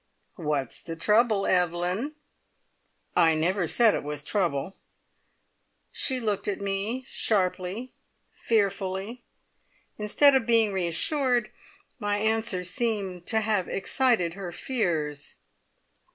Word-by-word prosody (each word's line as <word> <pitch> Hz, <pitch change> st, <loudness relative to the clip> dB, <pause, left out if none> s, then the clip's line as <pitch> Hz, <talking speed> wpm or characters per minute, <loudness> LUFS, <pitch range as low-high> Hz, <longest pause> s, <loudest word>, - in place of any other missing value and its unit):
What's 150 Hz, -7 st, -2 dB
the 165 Hz, -, -6 dB
trouble, 210 Hz, +3 st, +3 dB
Evelyn?" 180 Hz, -, 0 dB, 1.0 s
"I 165 Hz, -2 st, +5 dB
never 175 Hz, +3 st, +1 dB
said 230 Hz, +5 st, +4 dB
it -, -, -1 dB
was 150 Hz, 0 st, -5 dB
trouble." 175 Hz, -1 st, -1 dB, 1.2 s
She 260 Hz, -2 st, 0 dB
looked 210 Hz, -4 st, -2 dB
at 205 Hz, -, -1 dB
me 200 Hz, +6 st, -2 dB
sharply, 195 Hz, +3 st, -1 dB, 0.4 s
fearfully. 200 Hz, +1 st, -1 dB, 0.8 s
Instead 275 Hz, +7 st, +5 dB
of 260 Hz, -3 st, +2 dB
being 225 Hz, -3 st, +3 dB
reassured, 240 Hz, -, +1 dB, 0.5 s
my 205 Hz, 0 st, 0 dB
answer 220 Hz, -3 st, 0 dB
seemed 190 Hz, -3 st, -2 dB
to 220 Hz, -1 st, +3 dB
have 210 Hz, -4 st, 0 dB
excited 215 Hz, -5 st, +1 dB
her 190 Hz, -2 st, -6 dB
fears. 160 Hz, -, -2 dB
200 Hz, 105 wpm, -27 LUFS, 175-225 Hz, 1.2 s, I